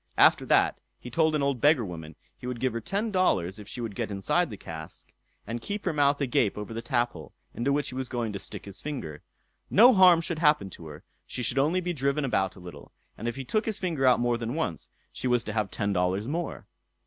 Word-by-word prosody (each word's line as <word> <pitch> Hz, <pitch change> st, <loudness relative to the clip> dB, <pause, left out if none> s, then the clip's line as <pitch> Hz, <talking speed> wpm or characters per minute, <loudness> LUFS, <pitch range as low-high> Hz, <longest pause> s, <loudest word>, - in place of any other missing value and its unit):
After -, -, +5 dB
that -, -, +3 dB, 0.2 s
he 125 Hz, -, -9 dB
told 160 Hz, +3 st, +2 dB
an 145 Hz, -, +1 dB
old 140 Hz, -4 st, 0 dB
beggar 145 Hz, -6 st, +4 dB
woman, 80 Hz, -4 st, -8 dB, 0.2 s
he 125 Hz, -, -9 dB
would 125 Hz, -2 st, -4 dB
give 130 Hz, -1 st, 0 dB
her 115 Hz, -, -3 dB
ten 205 Hz, -, -2 dB
dollars 100 Hz, -, +1 dB
if 105 Hz, -, -10 dB
she 120 Hz, -, -6 dB
would 115 Hz, -3 st, -4 dB
get -, -, -3 dB
inside 100 Hz, -, 0 dB
the 105 Hz, -, -7 dB
cask, 80 Hz, -3 st, -10 dB, 0.3 s
and 115 Hz, +2 st, -4 dB
keep 205 Hz, -, -5 dB
her 175 Hz, -, +1 dB
mouth 145 Hz, -1 st, +3 dB
agape 120 Hz, -7 st, +1 dB
over 105 Hz, +2 st, -6 dB
the 115 Hz, -, -4 dB
taphole, 120 Hz, -, -2 dB, 0.2 s
into 125 Hz, +4 st, 0 dB
which 145 Hz, +1 st, 0 dB
he -, -, -9 dB
was 130 Hz, -1 st, -4 dB
going 120 Hz, -4 st, -2 dB
to 100 Hz, -, -4 dB
stick -, -, -8 dB
his 100 Hz, -1 st, -10 dB
finger. 80 Hz, -, -5 dB, 0.5 s
No 245 Hz, +5 st, +7 dB
harm 185 Hz, -4 st, +7 dB
should 165 Hz, -1 st, -3 dB
happen 150 Hz, -, +3 dB
to 80 Hz, -, -10 dB
her; 75 Hz, 0 st, -10 dB, 0.2 s
she 125 Hz, -, -4 dB
should 125 Hz, +3 st, 0 dB
only 160 Hz, +7 st, +2 dB
be 175 Hz, 0 st, -2 dB
driven 140 Hz, 0 st, 0 dB
about 95 Hz, -6 st, 0 dB
a -, -, -13 dB
little; 90 Hz, -1 st, -11 dB, 0.2 s
and 115 Hz, -, -5 dB
if 120 Hz, -, -2 dB
he 135 Hz, -1 st, -6 dB
took 215 Hz, -, 0 dB
his 220 Hz, -, -1 dB
finger 160 Hz, -8 st, 0 dB
out 125 Hz, -, +5 dB
more 120 Hz, -1 st, +1 dB
than 115 Hz, +3 st, -3 dB
once, 160 Hz, -, -3 dB, 0.2 s
she 130 Hz, -, -4 dB
was 125 Hz, -2 st, +2 dB
to 110 Hz, -, -5 dB
have 105 Hz, -2 st, 0 dB
ten 100 Hz, 0 st, -1 dB
dollars 95 Hz, +3 st, 0 dB
more. 165 Hz, +4 st, -3 dB
125 Hz, 245 wpm, -27 LUFS, 105-150 Hz, 0.5 s, No